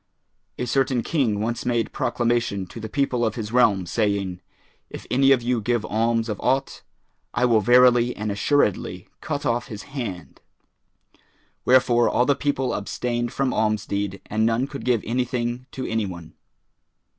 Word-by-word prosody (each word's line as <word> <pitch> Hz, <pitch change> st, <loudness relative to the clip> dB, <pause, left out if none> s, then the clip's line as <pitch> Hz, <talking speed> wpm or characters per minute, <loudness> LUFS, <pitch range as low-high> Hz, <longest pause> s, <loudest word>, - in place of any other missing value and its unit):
A 125 Hz, -, -2 dB
certain 130 Hz, -1 st, +1 dB
King 115 Hz, -10 st, 0 dB
once 115 Hz, +2 st, -2 dB
made 120 Hz, -2 st, 0 dB
proclamation 120 Hz, -5 st, 0 dB
to 90 Hz, -, -10 dB
the 110 Hz, 0 st, -6 dB
people 130 Hz, -2 st, 0 dB
of 110 Hz, -2 st, 0 dB
his 110 Hz, -2 st, -5 dB
realm 110 Hz, -7 st, +3 dB
saying, 100 Hz, -2 st, -1 dB, 0.5 s
"If -, -, -9 dB
any 135 Hz, +2 st, +4 dB
of 130 Hz, -3 st, +4 dB
you 120 Hz, -1 st, 0 dB
give 120 Hz, 0 st, 0 dB
alms 115 Hz, +1 st, 0 dB
of 105 Hz, -3 st, -4 dB
aught, 135 Hz, +1 st, 0 dB, 0.5 s
I 125 Hz, -, +3 dB
will 115 Hz, -3 st, +4 dB
verily 125 Hz, +2 st, +5 dB
and 105 Hz, 0 st, -3 dB
assuredly 100 Hz, -5 st, 0 dB
cut 145 Hz, -2 st, -3 dB
off 120 Hz, +1 st, 0 dB
his 105 Hz, -1 st, -8 dB
hand;" 105 Hz, -, -6 dB, 1.2 s
wherefore 125 Hz, -2 st, +4 dB
all 125 Hz, -, +2 dB
the 140 Hz, -, +4 dB
people 140 Hz, -2 st, -1 dB
abstained 120 Hz, +3 st, -2 dB
from 135 Hz, -2 st, -1 dB
alms 110 Hz, -2 st, 0 dB
deed, 100 Hz, -1 st, -3 dB
and 110 Hz, +1 st, -1 dB
none 115 Hz, +3 st, +2 dB
could 140 Hz, 0 st, -8 dB
give 120 Hz, -4 st, +1 dB
anything 125 Hz, +1 st, -2 dB
to 130 Hz, -, -4 dB
any 110 Hz, -2 st, -1 dB
one. 85 Hz, -3 st, -9 dB
120 Hz, 160 wpm, -23 LUFS, 105-125 Hz, 1.2 s, verily